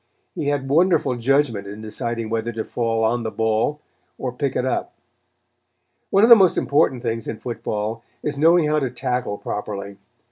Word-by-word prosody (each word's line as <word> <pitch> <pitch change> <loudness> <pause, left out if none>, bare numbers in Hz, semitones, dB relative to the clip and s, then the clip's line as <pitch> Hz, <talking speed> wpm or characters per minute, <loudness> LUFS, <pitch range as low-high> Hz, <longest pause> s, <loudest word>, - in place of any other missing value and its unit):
He 145 - -3
had 145 -2 -1
wonderful 155 -3 +3
judgment 120 -5 +1
in 105 +2 -8
deciding 110 +1 -3
whether 115 +1 -1
to 110 0 -3
fall 115 -1 -1
on 120 +2 +1
the 110 - -3
ball 110 +7 0 0.4
or 130 - -3
pick 135 +2 -2
it 125 - 0
up. 130 - -2 1.1
One 195 +2 +4
of 230 - +6
the - - +13
most 190 -5 +4
important 135 -3 +2
things 115 -2 -3
in 110 - -4
football 115 -1 -4 0.2
is 150 - -2
knowing 165 +2 +4
how 150 0 +2
to 135 -3 -1
tackle 125 -3 -2
properly. 100 -1 -5
120 Hz, 175 wpm, -22 LUFS, 110-145 Hz, 1.1 s, the